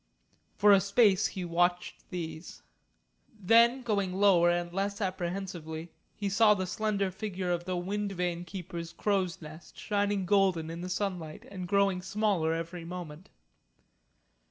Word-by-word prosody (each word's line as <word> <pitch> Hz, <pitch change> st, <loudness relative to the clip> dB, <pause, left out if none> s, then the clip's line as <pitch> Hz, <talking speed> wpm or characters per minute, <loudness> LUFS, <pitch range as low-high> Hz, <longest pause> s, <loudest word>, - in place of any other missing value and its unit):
For 205 Hz, 0 st, +5 dB
a 195 Hz, -1 st, +7 dB
space 200 Hz, -1 st, +4 dB
he 185 Hz, -2 st, -5 dB
watched 175 Hz, +1 st, -1 dB
these. 165 Hz, -2 st, -7 dB, 0.8 s
Then 235 Hz, +6 st, +4 dB
going 200 Hz, -5 st, 0 dB
lower 185 Hz, -3 st, +5 dB
and 175 Hz, 0 st, -1 dB
less 200 Hz, +2 st, -2 dB
apprehensively, 175 Hz, -4 st, -4 dB, 0.2 s
he 205 Hz, -, -3 dB
saw 210 Hz, +2 st, +5 dB
the 185 Hz, -1 st, -2 dB
slender 200 Hz, 0 st, -1 dB
figure 190 Hz, -2 st, -4 dB
of 175 Hz, 0 st, -2 dB
the 185 Hz, -1 st, -2 dB
Wind 200 Hz, +3 st, -2 dB
Vane 175 Hz, -1 st, -2 dB
keeper's 170 Hz, -2 st, -7 dB
crow's 190 Hz, -4 st, -1 dB
nest 155 Hz, +2 st, -12 dB
shining 205 Hz, -2 st, 0 dB
golden 185 Hz, -4 st, +2 dB
in 170 Hz, +1 st, -6 dB
the 180 Hz, -, -5 dB
sunlight 180 Hz, -5 st, -4 dB
and 185 Hz, -2 st, -6 dB
growing 200 Hz, -1 st, +2 dB
smaller 195 Hz, -4 st, 0 dB
every 165 Hz, +1 st, -4 dB
moment. 170 Hz, -1 st, -8 dB
185 Hz, 140 wpm, -30 LUFS, 175-200 Hz, 0.8 s, a